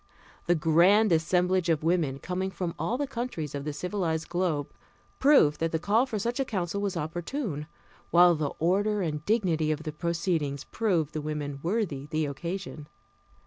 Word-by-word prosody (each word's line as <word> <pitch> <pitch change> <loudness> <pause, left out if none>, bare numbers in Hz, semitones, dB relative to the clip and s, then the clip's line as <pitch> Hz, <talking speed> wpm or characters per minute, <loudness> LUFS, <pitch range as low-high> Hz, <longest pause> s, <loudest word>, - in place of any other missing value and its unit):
The 175 - +4
grand 175 +7 +4
assemblage 180 +2 +2
of 155 -2 +1
women, 160 -5 +1
coming 180 +5 -3
from 180 -3 -4
all 245 - -1
the 285 - -1
countries 235 - -4
of 140 0 -4
the 150 - -2
civilized 165 0 -2
globe, 170 -5 -1 0.5
proved 270 - +5
that 165 0 0
the 160 - +1
call 215 +9 +2
for 225 - -3
such 235 +5 -2
a - - +3
council 200 -5 -2
was 200 -3 -2
opportune, 170 - -4 0.4
while 175 0 +6
the 150 -3 -1
order 200 +4 +1
and 150 -3 -3
dignity 175 -8 +1
of 155 0 -3
the 155 - -4
proceedings 165 -3 -1
proved 170 -9 0
the 155 - -3
women 145 -2 -4
worthy 165 -7 -2
the 155 0 -1
occasion. 160 +1 -5
170 Hz, 170 wpm, -28 LUFS, 155-195 Hz, 0.5 s, while